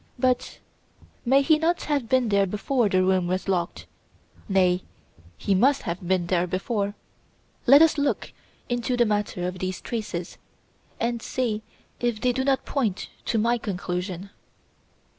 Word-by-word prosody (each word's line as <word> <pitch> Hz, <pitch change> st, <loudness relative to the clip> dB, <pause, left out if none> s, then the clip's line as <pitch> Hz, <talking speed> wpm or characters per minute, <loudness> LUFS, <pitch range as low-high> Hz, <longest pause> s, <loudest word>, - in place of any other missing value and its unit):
But 255 Hz, 0 st, 0 dB, 0.7 s
may 270 Hz, +3 st, +5 dB
he 305 Hz, +2 st, +4 dB
not 340 Hz, +2 st, +1 dB
have 280 Hz, -6 st, -1 dB
been 255 Hz, -3 st, +3 dB
there 200 Hz, -1 st, +3 dB
before 215 Hz, +4 st, 0 dB
the 185 Hz, -1 st, +3 dB
room 185 Hz, -1 st, +2 dB
was 185 Hz, +2 st, -2 dB
locked. 180 Hz, -3 st, -1 dB, 0.6 s
Nay, 185 Hz, -2 st, +3 dB, 0.6 s
he 200 Hz, -, 0 dB
must 265 Hz, +9 st, +3 dB
have 175 Hz, 0 st, -4 dB
been 185 Hz, -1 st, +2 dB
there 175 Hz, 0 st, +1 dB
before! 200 Hz, +3 st, -2 dB, 0.7 s
Let 280 Hz, +5 st, +9 dB
us 320 Hz, -2 st, +3 dB
look 285 Hz, -, -1 dB, 0.3 s
into 245 Hz, +1 st, -1 dB
the 240 Hz, -, +4 dB
matter 205 Hz, -4 st, -1 dB
of 180 Hz, 0 st, -5 dB
these 185 Hz, 0 st, -3 dB
traces 200 Hz, -7 st, -5 dB, 0.6 s
and 235 Hz, 0 st, -1 dB
see 230 Hz, -4 st, -2 dB, 0.4 s
if 240 Hz, -3 st, 0 dB
they 250 Hz, +3 st, +2 dB
do 260 Hz, +2 st, 0 dB
not 270 Hz, -1 st, +1 dB
point 230 Hz, -10 st, -1 dB, 0.2 s
to 230 Hz, -, 0 dB
my 235 Hz, +2 st, +2 dB
conclusion. 185 Hz, -1 st, -4 dB
210 Hz, 150 wpm, -25 LUFS, 185-250 Hz, 0.7 s, Let